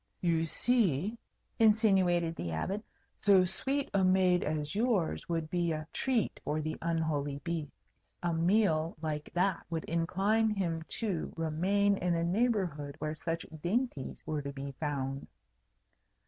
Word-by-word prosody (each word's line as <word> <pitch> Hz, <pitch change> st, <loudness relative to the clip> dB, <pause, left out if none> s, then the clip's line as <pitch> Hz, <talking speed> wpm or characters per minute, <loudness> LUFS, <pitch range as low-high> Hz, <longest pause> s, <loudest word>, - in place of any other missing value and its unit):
"You 165 Hz, -2 st, +2 dB
see," 210 Hz, -, +1 dB, 0.4 s
insinuated 190 Hz, -7 st, +4 dB
the 85 Hz, -, -4 dB
Abbot, 190 Hz, -, -2 dB, 0.4 s
"so 195 Hz, -3 st, +6 dB
sweet 270 Hz, +10 st, -2 dB
a 195 Hz, -1 st, +3 dB
maid 185 Hz, -1 st, +4 dB
as 150 Hz, 0 st, -2 dB
yours 200 Hz, -, 0 dB
would 165 Hz, -2 st, -1 dB
be 175 Hz, -2 st, +1 dB
a 155 Hz, 0 st, -3 dB
treat 255 Hz, -5 st, 0 dB
for 155 Hz, -, -1 dB
the 155 Hz, 0 st, -2 dB
unholy 155 Hz, -4 st, -1 dB
beast. 165 Hz, -4 st, -4 dB, 0.5 s
A 175 Hz, -1 st, +1 dB
meal 165 Hz, -2 st, +2 dB
like 150 Hz, -1 st, -3 dB
that 185 Hz, 0 st, +1 dB
would 165 Hz, -1 st, -2 dB
incline 195 Hz, +7 st, +1 dB
him 175 Hz, -6 st, -1 dB, 0.2 s
to 195 Hz, -8 st, -1 dB
remain 190 Hz, +6 st, +2 dB
in 175 Hz, -2 st, 0 dB
a 165 Hz, -, 0 dB
neighbourhood 175 Hz, -, 0 dB
where 155 Hz, -1 st, -3 dB
such 165 Hz, +1 st, -3 dB, 0.2 s
dainties 200 Hz, -, -2 dB
were 155 Hz, -1 st, -2 dB
to 140 Hz, 0 st, -5 dB
be 140 Hz, 0 st, -6 dB
found." 135 Hz, -2 st, -2 dB
170 Hz, 140 wpm, -32 LUFS, 155-200 Hz, 0.5 s, so